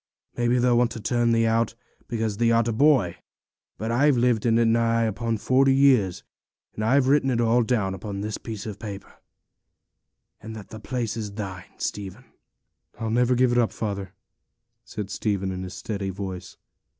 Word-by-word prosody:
Maybe 120 +1 +1
they'll 120 -1 +3
want 120 -1 +3
to - - -7
turn 120 +1 +1
thee 115 0 +3
out, 115 0 +1 0.3
because 110 -3 -2
thee 115 0 +3
art 115 0 +3
a - - +1
boy; 115 - +3 0.6
but 110 +1 -3
I've 135 +3 +3
lived 120 -2 +2
in 115 0 +3
it 115 - +3
nigh 115 0 +2
upon 115 +1 -1
forty 135 +4 +3
years, 130 -10 +3 0.5
and 110 - -4
I've 130 +4 +3
written 140 0 +3
it 120 -3 0
all 120 +1 +3
down 110 -5 0
upon 100 +1 -5
this 105 +1 -4
piece 110 -3 -7
of 105 -2 -6
paper, 100 -3 -8 1.3
and 110 +1 -8
that 105 -3 -10
the 110 - -9
place 120 0 -3
is 105 -3 -5
thine, 95 -4 -7
Stephen.' 105 +5 -5 0.7
'I'll 110 -1 -2
never 125 +2 +3
give 125 0 +3
it 120 - +3
up, 115 - +2
father,' 100 -3 -4 0.7
said 105 -2 -6
Stephen, 100 -3 -1
in 95 0 -5
his 90 0 -7
steady 100 0 -4
voice. 95 -1 -6
115 Hz, 180 wpm, -25 LUFS, 100-120 Hz, 1.3 s, they'll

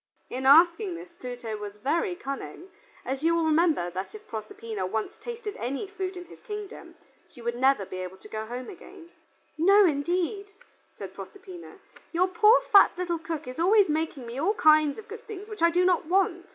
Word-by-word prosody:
In 260 +1 -2
asking 340 +6 +5
this 345 +1 -10
Pluto 245 -8 -6
was 205 -1 -7
very 335 - -1
cunning, 275 +5 -7 0.4
as 265 +1 -3
you 335 +1 +3
will 335 -1 +1
remember 315 - +2
that 190 - -6
if 430 0 -12
Proserpina 220 -1 -6
once 220 - -3
tasted 465 -3 -6
any 265 - -3
food 380 -2 -5
in 355 - -8
his - - -15
kingdom, 420 -4 -8 0.3
she - - -18
would 235 0 -3
never 260 -3 +3
again - - -13
be 185 - -5
able 185 +1 -8
to 200 - -14
go 220 0 -5
home. 250 - -7 0.8
"No, 395 +5 +6
indeed," 360 +6 -1 0.4
said - - -8
Proserpina. 375 -3 -11 0.4
"Your 360 +2 +3
poor 430 +5 +5
fat 400 - +6
little 350 -2 -2
cook 315 -2 -5
is 255 +4 -7
always 395 +2 +4
making 305 -4 -2
me 235 +3 -6
all 390 +9 +1
kinds 310 -7 +4
of 440 - -10
good 460 +3 -10
things 415 -1 -8
which 430 -4 -9
I 335 - +6
do 355 +2 +2
not 360 -3 +2
want. 360 0 +1
335 Hz, 190 wpm, -27 LUFS, 255-390 Hz, 0.8 s, No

